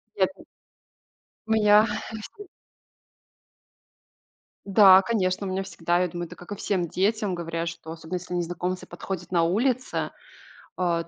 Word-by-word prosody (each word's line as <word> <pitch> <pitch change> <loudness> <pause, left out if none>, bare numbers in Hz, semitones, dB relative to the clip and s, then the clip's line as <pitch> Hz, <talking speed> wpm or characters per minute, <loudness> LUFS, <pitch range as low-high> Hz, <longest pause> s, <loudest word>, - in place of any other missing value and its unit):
Ехать - - -1 1.0
У - - -3
меня 210 -1 +6 0.3
есть 220 -1 -8
ну 410 - -9 2.2
Да, 195 -1 +7
конечно, 190 -3 0
у - - -3
меня 190 +1 -1
всегда, 175 -2 -1
я 180 - +2
думаю, 175 0 -5
это - - -11
как 180 - -13
и - - -2
всем 190 -3 -1
детям, 200 +2 0
говорят, 165 0 -3
что 165 -1 -9
особенно, 165 +2 -6
если 180 0 -5
незнакомцы 175 +1 -3
подходят 180 -2 -6
на 170 -2 +3
улице, 245 +9 0 0.7
э, 170 -2 0
185 Hz, 140 wpm, -25 LUFS, 175-205 Hz, 2.2 s, Да